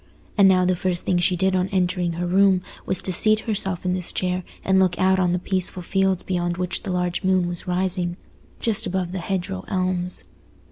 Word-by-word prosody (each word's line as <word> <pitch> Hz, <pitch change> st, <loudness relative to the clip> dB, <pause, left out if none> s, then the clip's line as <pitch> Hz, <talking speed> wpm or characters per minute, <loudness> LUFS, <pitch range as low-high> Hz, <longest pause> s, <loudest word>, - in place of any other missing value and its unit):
And 200 Hz, -2 st, +6 dB
now 185 Hz, -1 st, +4 dB
the 185 Hz, 0 st, +2 dB
first 180 Hz, -1 st, -2 dB
thing 180 Hz, -2 st, +1 dB
she 180 Hz, +1 st, +2 dB
did 190 Hz, +1 st, +1 dB
on 185 Hz, 0 st, +1 dB
entering 180 Hz, -2 st, 0 dB
her 175 Hz, +2 st, -3 dB
room 190 Hz, 0 st, +3 dB, 0.2 s
was 190 Hz, -, 0 dB
to 185 Hz, -, +3 dB
seat 215 Hz, +4 st, +3 dB
herself 190 Hz, -5 st, 0 dB
in 180 Hz, -, +1 dB
this 180 Hz, -1 st, -2 dB
chair 180 Hz, 0 st, -1 dB, 0.2 s
and 190 Hz, 0 st, +3 dB
look 185 Hz, -2 st, +2 dB
out 190 Hz, 0 st, +3 dB
on 180 Hz, -1 st, +2 dB
the 180 Hz, -, +1 dB
peaceful 185 Hz, 0 st, -2 dB
fields 190 Hz, 0 st, 0 dB
beyond 175 Hz, -2 st, -2 dB
which 180 Hz, 0 st, -2 dB
the 195 Hz, -, -5 dB
large 180 Hz, -1 st, -1 dB
moon 185 Hz, -1 st, +2 dB
was 175 Hz, 0 st, -4 dB
rising, 180 Hz, -1 st, -1 dB, 0.4 s
just 225 Hz, -3 st, +2 dB
above 180 Hz, -1 st, -2 dB
the 190 Hz, -, -4 dB
hedgerow 175 Hz, -, -3 dB
elms. 185 Hz, -, -1 dB
185 Hz, 205 wpm, -23 LUFS, 180-190 Hz, 0.4 s, And